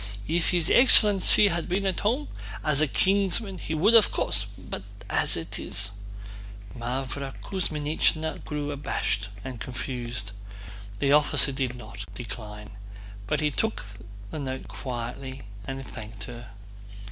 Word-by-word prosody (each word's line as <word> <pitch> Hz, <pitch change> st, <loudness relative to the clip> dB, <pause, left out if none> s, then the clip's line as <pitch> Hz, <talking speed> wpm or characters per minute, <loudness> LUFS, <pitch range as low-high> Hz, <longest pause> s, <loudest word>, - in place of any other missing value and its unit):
"If 165 Hz, +1 st, +1 dB
his 175 Hz, -2 st, +3 dB
excellency 210 Hz, -4 st, +7 dB
had 170 Hz, 0 st, -2 dB
been 195 Hz, +3 st, 0 dB
at 190 Hz, -2 st, 0 dB
home, 250 Hz, +8 st, 0 dB, 0.4 s
as 150 Hz, -1 st, +4 dB
a 155 Hz, -, +4 dB
kinsman 195 Hz, -, +2 dB
he 160 Hz, -, -3 dB
would 200 Hz, +9 st, +4 dB
of 225 Hz, -4 st, +8 dB
course... -, -, +1 dB
but -, -, -8 dB, 0.3 s
as -, -, +2 dB
it -, -, -4 dB
is..." 100 Hz, 0 st, -2 dB, 0.8 s
Mávra 130 Hz, +3 st, -4 dB
Kuzmínichna 160 Hz, -3 st, 0 dB
grew 145 Hz, -1 st, -3 dB
abashed 105 Hz, -7 st, -2 dB, 0.2 s
and 125 Hz, -4 st, -6 dB
confused. 120 Hz, -4 st, -4 dB, 0.7 s
The 140 Hz, +6 st, +1 dB
officer 145 Hz, -1 st, +5 dB
did 130 Hz, -2 st, -2 dB
not 100 Hz, -4 st, -9 dB
decline, 105 Hz, -2 st, -8 dB, 0.6 s
but -, -, 0 dB
took 220 Hz, -, -1 dB, 0.5 s
the 155 Hz, -, -4 dB
note 130 Hz, -2 st, -4 dB
quietly 130 Hz, +1 st, -6 dB, 0.2 s
and 135 Hz, 0 st, -5 dB
thanked 110 Hz, -1 st, -8 dB
her. 120 Hz, -1 st, -9 dB
140 Hz, 130 wpm, -27 LUFS, 120-175 Hz, 0.8 s, of